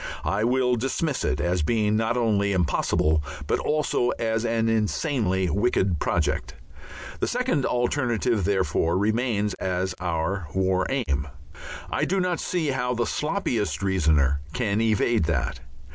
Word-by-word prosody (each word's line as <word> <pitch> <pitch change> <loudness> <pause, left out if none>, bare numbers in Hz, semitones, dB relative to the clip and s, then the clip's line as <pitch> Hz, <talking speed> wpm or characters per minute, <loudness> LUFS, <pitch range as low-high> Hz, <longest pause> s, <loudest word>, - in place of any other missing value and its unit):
I 100 +2 0
will 125 +1 +2
dismiss 135 +4 -1
it 75 0 0
as 90 0 0
being 105 +5 +1
not 115 +2 +1
only 100 -4 +1
impossible, 80 -3 +1 0.2
but - - 0
also 150 -5 0
as 115 0 -1
an 115 -1 +1
insanely 110 - 0
wicked 95 -4 +1
project. - - -1 0.6
The - - 0
second 250 - 0
alternative, 120 -3 0
therefore, 90 -3 +1
remains 105 0 0
as 95 0 -1
our 85 +1 -2
War 95 -1 +1
Aim. 75 - -1 0.6
I - - +1
do 195 +2 0
not 180 -2 0
see 170 -5 -1
how 125 -2 -1
the 120 0 0
sloppiest 110 - -1
reasoner 75 -7 +2
can 110 -3 0
evade 110 -3 +2
that. 85 - -1
110 Hz, 135 wpm, -25 LUFS, 95-125 Hz, 0.6 s, will